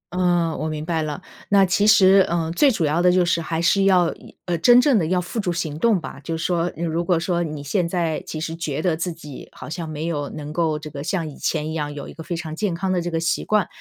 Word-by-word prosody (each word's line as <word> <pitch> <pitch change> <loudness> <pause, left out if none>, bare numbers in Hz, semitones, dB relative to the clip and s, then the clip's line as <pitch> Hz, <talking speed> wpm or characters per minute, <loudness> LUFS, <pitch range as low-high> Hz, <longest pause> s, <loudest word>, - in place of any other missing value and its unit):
嗯， 175 -3 +1
我 155 - -2
明 155 0 -4
白 165 -1 -1
了。 150 -2 -4 0.3
那 200 -1 +5
其 200 +3 +2
实， 195 -2 +7
嗯， 165 -1 -1
最 280 - +4
主 205 -10 0
要 155 +3 +1
的 180 0 +5
就 180 0 +3
是 170 -1 +1
还 160 0 -3
是 195 +4 +3
要 180 -3 +4
以 - - -16
呃， 175 - -1
真 240 +9 +7
正 250 -3 +4
地 160 - 0
要 180 +2 +1
付 180 +6 -4
诸 185 -4 -1
行 155 -3 -3
动 225 -2 +3
吧。 155 - -8
就 165 +4 -3
是 165 - -4
说 175 -1 0
如 165 +1 -2
果 175 -1 +1
说 175 0 -1
你 155 -3 -4
现 170 +4 0
在 165 -3 -1
其 155 - -5
实 160 +1 -4
觉 155 -4 -3
得 175 -3 +2
自 170 +2 -3
己 150 -5 -10
好 - - -10
像 165 0 -5
没 155 +1 -4
有 145 -4 -2
能 150 -1 -7
够 160 -2 0
这 155 0 -9
个 140 -1 -6
像 170 0 -2
以 145 - -9
前 155 -1 -2
一 - - -4
样 150 -2 -3
有 145 - -7
一 - - -10
个 160 - -10
非 170 +2 -4
常 160 -2 -5
健 190 -1 -1
康 185 +2 -1
这 180 - 0
个 - - -9
的 165 - 0
习 165 0 0
惯， 210 -4 +1
170 Hz, 300 characters per minute, -22 LUFS, 155-180 Hz, 0.3 s, 实